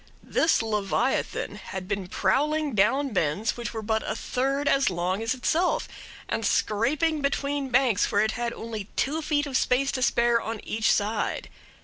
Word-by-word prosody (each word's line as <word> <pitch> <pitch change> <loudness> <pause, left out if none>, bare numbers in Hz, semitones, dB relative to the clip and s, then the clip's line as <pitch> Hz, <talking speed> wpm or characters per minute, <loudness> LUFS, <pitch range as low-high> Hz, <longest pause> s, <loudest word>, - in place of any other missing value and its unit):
This 320 -7 +2
leviathan 210 -3 -1
had 190 -1 -7
been 200 -2 -3
prowling 300 +8 +1
down 265 +8 +2
bends 190 - 0
which 240 -1 -5
were 220 -1 -5
but 220 +1 0
a - - -1
third 275 +3 -1
as 275 0 +3
long 180 +3 -1
as 225 +3 0
itself, 330 +8 +1 0.4
and - - -2
scraping 295 +9 +1
between 280 0 -1
banks 250 -4 +2
where 205 - +3
it 220 - +1
had 240 0 -2
only 225 -3 -6
two 305 +4 0
feet 295 -1 0
of 275 -3 -5
space 265 +2 +2
to 255 - -3
spare 235 -1 +3
on 225 0 -4
each 220 0 +1
side. 210 +2 -1
235 Hz, 165 wpm, -26 LUFS, 215-280 Hz, 0.4 s, as